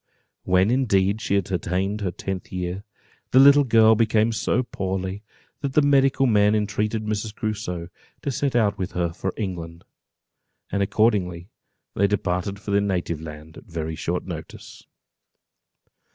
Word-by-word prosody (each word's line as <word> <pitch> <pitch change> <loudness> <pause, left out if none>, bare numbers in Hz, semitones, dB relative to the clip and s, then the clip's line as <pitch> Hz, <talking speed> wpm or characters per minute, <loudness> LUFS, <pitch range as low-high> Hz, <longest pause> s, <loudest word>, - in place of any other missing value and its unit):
When 95 +4 +3
indeed 105 -5 +2
she 100 - 0
had 100 -2 -1
attained 95 +4 -1
her 95 - -1
tenth 95 +1 -6
year, 90 +1 -4 0.5
the - - +2
little 140 +2 +8
girl 110 -3 +5
became 110 0 +2
so 120 +3 0
poorly, 95 -2 -4 0.4
that 140 -2 -3
the 150 - +4
medical 135 -1 +3
men 105 -3 +4
entreated 105 +1 -1
Mrs. 105 0 -3
Crusoe 100 -6 -4 0.4
to 140 - -1
set 135 0 -1
out 105 -4 +2
with 95 0 -3
her 85 -2 -1
for 95 +2 -3
England; 85 -5 -5 0.9
and 100 - 0
accordingly 95 -3 +1 0.4
they 100 - +2
departed 100 -1 -2
for 105 0 -6
their 100 0 +3
native 90 -5 -2
land, 80 0 -10
at - - -11
a 100 - -20
very 80 -1 -3
short - - -3
notice. - - -9
100 Hz, 150 wpm, -24 LUFS, 90-110 Hz, 0.9 s, little